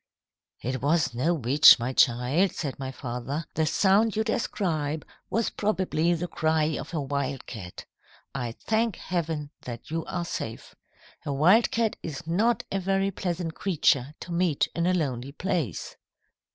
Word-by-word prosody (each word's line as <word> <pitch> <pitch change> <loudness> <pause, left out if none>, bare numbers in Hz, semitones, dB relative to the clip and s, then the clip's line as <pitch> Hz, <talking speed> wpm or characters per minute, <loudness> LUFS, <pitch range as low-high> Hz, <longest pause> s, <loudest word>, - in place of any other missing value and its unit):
"'It 130 0 -2
was 150 -1 +2
no 130 +8 +1
witch, 145 +3 +7
my 120 +2 -3
child,' 130 +11 +3
said 140 -5 -4
my 130 -1 -4
father. 130 +4 -4
'The 160 0 +1
sound 205 +6 +3
you 220 - +1
describe 160 -9 -1 0.2
was 230 0 0
probably 185 -5 0
the 175 +2 -3
cry 160 -2 +1
of - - -6
a - - 0
wildcat. 135 -9 -4 0.5
I 120 -4 -3
thank 220 - 0
Heaven 160 -5 -3
that 120 +3 -8
you 165 0 -1
are 175 -1 -3
safe. 115 -8 -6 0.5
A - - -3
wildcat 215 +9 +3
is 155 -3 -6
not 215 +9 +1
a 195 - 0
very 195 +1 +1
pleasant 175 -3 -3
creature 150 -7 +1
to 175 - -7
meet 170 -4 +1
in 170 0 0
a 185 - +3
lonely 135 -5 -2
place.' 160 - -2
160 Hz, 150 wpm, -27 LUFS, 135-185 Hz, 0.5 s, witch